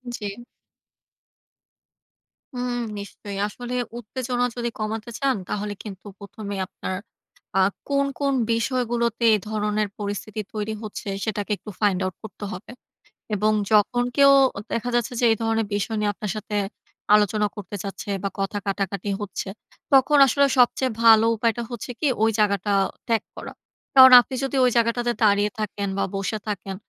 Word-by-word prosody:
জি। 210 +3 -6 2.1
হুম 245 0 -2 0.2
নিশ্চয়ই। 200 0 -8
আসলে 245 +4 -7 0.3
উত্তেজনা 245 +2 -2
যদি 235 -1 -2
কমাতে 215 +2 -3
চান 275 -2 +2
তাহলে 210 0 -3
কিন্তু 195 -3 -9
১ম 200 +1 -10
এ - - -4
আপনার 185 - -5 0.6
আ - - +6 0.3
কোন, 280 0 +2
কোন, 280 -1 +1 0.2
বিষয়গুলোতে 235 -1 0
এ - - +1
ধরনের 210 0 0
পরিস্থিতি 205 +1 -4
তৈরি 215 0 -3
হচ্ছে 210 -1 -6
সেটাকে 210 -1 -3
একটু 210 - -11
Find 200 -3 +2
Out 185 - -4
করতে 215 -1 -8
হবে। 185 +6 -9 0.6
এবং 210 +2 +2 0.2
যখন 220 +3 +4
কেউ 280 0 +7 0.4
দেখা 240 +2 -1
যাচ্ছে 240 0 0
যে 245 - +3
এই - - +3
ধরনের 225 -1 0
বিষয় 215 +2 -2
নিয়ে 210 -1 +1
আপনার 210 -1 -4
সাথে 210 0 -5 0.6
আলোচনা 210 0 +2
করতে 205 0 -7
চাচ্ছে 200 0 -6
বা 200 - 0
কথা 195 +1 -1
কাটাকাটি 195 0 -2
হচ্ছে, 200 -1 -5 0.4
তখন 275 +2 +5
আসলে 280 +3 +3
সবচেয়ে 255 +1 +3
ভালো 225 -1 +7
উপায়টা 230 +1 0
হচ্ছে 240 0 -6
কি 305 - +1 0.2
ওই 225 - +4
জায়গাটা 205 0 +2 0.3
ত্যাগ 230 -2 +1
করা। - - -8 0.4
কারণ 260 -1 +10
আপনি 260 - -7
যদি 270 - -2
ওই 250 - +5
জায়গাটাতে 235 +1 +1
দাঁড়িয়ে 205 0 +3
থাকেন 205 -1 -3
বা 195 - +1
বসে 195 +2 -2
থাকেন 195 -2 -4
215 Hz, 150 wpm, -24 LUFS, 205-240 Hz, 2.1 s, কারণ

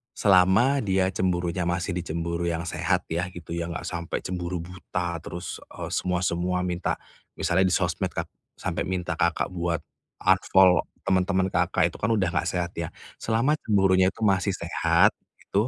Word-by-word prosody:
selama 100 +8 +4
dia 95 -1 +2
cemburunya 90 -1 0
masih 85 0 -1
di 90 - -2
cemburu 85 +1 -2
yang 85 0 -2
sehat - - 0
ya 85 +2 -1
gitu 85 -2 -10
ya, 85 0 -3
enggak 80 - -5
sampai 85 0 -3
cemburu 90 0 -3
buta 90 -1 -4
terus, 90 0 -6
e - - -6
semua-semua 90 0 0
minta. 90 0 -1 0.4
Misalnya 90 +3 +2
di - - 0
sosmed - - 0
Kak, - - -3 0.3
sampai - - -2
minta 90 -2 -2
Kakak 85 -1 +1
buat 85 -2 -1 0.4
unfollow 95 -1 +5 0.2
teman-teman 95 0 +1
Kakak 85 0 +2
itu - - -11
kan 115 - 0
udah 95 -4 +1
nggak 90 - 0
sehat 90 -1 -1
ya, 85 - -2 0.3
selama 120 +7 +1
cemburunya 95 -3 +4
itu 115 - -6
masih 95 -1 +2
sehat, 85 -2 +3 0.3
itu, 105 +5 0
90 Hz, 160 wpm, -26 LUFS, 85-95 Hz, 0.4 s, unfollow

